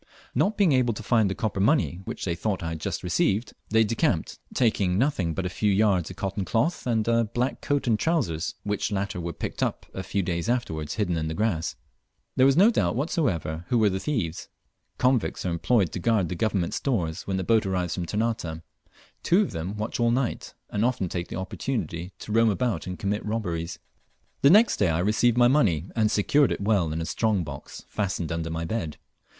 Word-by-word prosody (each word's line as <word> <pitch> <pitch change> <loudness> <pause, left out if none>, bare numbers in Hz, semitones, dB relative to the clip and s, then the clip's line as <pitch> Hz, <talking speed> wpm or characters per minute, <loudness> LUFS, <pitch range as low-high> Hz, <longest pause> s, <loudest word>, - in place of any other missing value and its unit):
Not 210 +2 +1
being 200 -6 +4
able 125 -4 +2
to 115 - -7
find 110 -2 +3
the 95 - -2
copper 105 -3 -2
money 105 - +2
which - - -5
they 85 - 0
thought 95 +1 -2
I 80 - -2
had 80 -1 -5
just - - -3
received, 100 +5 +1 0.2
they 110 +1 +4
decamped, 110 +1 0
taking 100 -6 +1
nothing 100 - +1
but 95 - -2
a - - +1
few 105 +3 0
yards 95 -4 +2
of - - -8
cotton 100 0 -3
cloth 125 - 0
and 115 -2 +1
a 115 0 +3
black 120 +4 -2
coat 145 -1 0
and 110 -4 +2
trousers, 100 - 0
which 105 +1 -1
latter 100 -3 -2
were 85 0 -3
picked - - -5
up - - -1
a 95 - -4
few 100 +1 -1
days 85 +2 -2
afterwards 80 -12 -2
hidden 95 -6 0
in 80 0 -2
the 80 - -3
grass. 90 -7 -1 0.6
There 130 - +5
was 135 +2 +3
no 205 +6 +7
doubt 90 - +1
whatever 90 - -1
who 120 - +2
were 110 -3 +4
the 95 - -2
thieves. 95 - -3 0.5
Convicts 125 -6 +1
are 90 - 0
employed 90 +2 +2
to - - -4
guard 100 -3 +1
the - - -2
Government 95 -2 0
stores 90 - -2
when 95 -1 -1
the 95 - -1
boat 110 +1 +2
arrives 90 -3 -1
from 90 -2 -3
Ternate. 105 -7 -2 0.6
Two 180 +4 +4
of - - -4
them 90 +6 -4
watch 105 +3 -3
all 120 0 +3
night, 120 +1 -1 0.2
and 105 - 0
often 115 -7 0
take 85 0 -3
the - - -6
opportunity 95 -2 -3
to 105 - -8
roam 115 +1 +4
about 105 -4 -1
and 90 0 -4
commit 105 +1 -2
robberies. 90 -6 -3 0.6
The 140 - +7
next 215 +7 +6
day 100 - +2
I 80 - +1
received 110 +6 +2
my 120 0 +6
money, 100 - +2
and 110 -2 +3
secured 130 +7 +3
it - - -1
well 100 -6 +1
in 80 +1 -2
a - - -2
strong 105 0 0
box 70 -3 -9
fastened 95 -5 -2
under 85 -1 -2
my 80 0 -3
bed. 80 -5 -3
100 Hz, 210 wpm, -26 LUFS, 85-115 Hz, 0.6 s, no